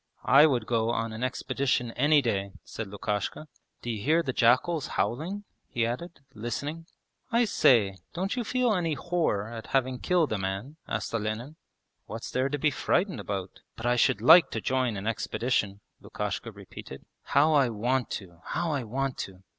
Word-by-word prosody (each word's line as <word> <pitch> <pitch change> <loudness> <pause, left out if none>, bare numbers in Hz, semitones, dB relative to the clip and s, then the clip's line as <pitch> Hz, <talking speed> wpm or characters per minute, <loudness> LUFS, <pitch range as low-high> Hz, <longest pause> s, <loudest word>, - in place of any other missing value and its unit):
'I 140 +5 +7
would 125 -7 0
go 115 -1 +1
on 115 -1 -1
an 110 +3 -5
expedition 130 -1 -1
any 145 +4 +3
day,' 100 -4 -1
said 115 - -6
Lukashka. 105 +8 -3 0.4
'D'you 115 -3 -3
hear 160 +8 +3
the 130 - -2
jackals 130 +8 +3
howling?' 175 - -1 0.3
he 115 -1 0
added, 140 +8 -5
listening. 145 +9 -4 0.4
'I 235 +1 +4
say, 105 - +4
don't 190 +4 -2
you 245 - -1
feel 250 0 +1
any 165 -5 0
horror 160 - 0
at 115 -1 -7
having 130 -1 -1
killed 170 -9 +2
a 105 - -1
man?' 95 +10 -4
asked - - -3
Olenin. 115 +6 -3 0.5
'What's 115 +1 -6
there 130 +2 +1
to 145 - -1
be 150 +1 +2
frightened 175 - 0
about? 100 -2 -5 0.2
But 115 - -7
I 120 0 +3
should 110 -4 +2
like 160 +8 +8
to 115 - -3
join 125 -2 0
an 100 - -6
expedition,' 115 -2 -1 0.2
Lukashka - - -4
repeated. 65 - -11 0.2
'How 155 +3 +3
I 140 -4 +4
want 120 +3 0
to! 85 -5 -8
How 175 -2 -1
I 140 -4 -1
want 130 +4 -3
to!' 95 -1 -7
125 Hz, 170 wpm, -28 LUFS, 110-155 Hz, 0.5 s, like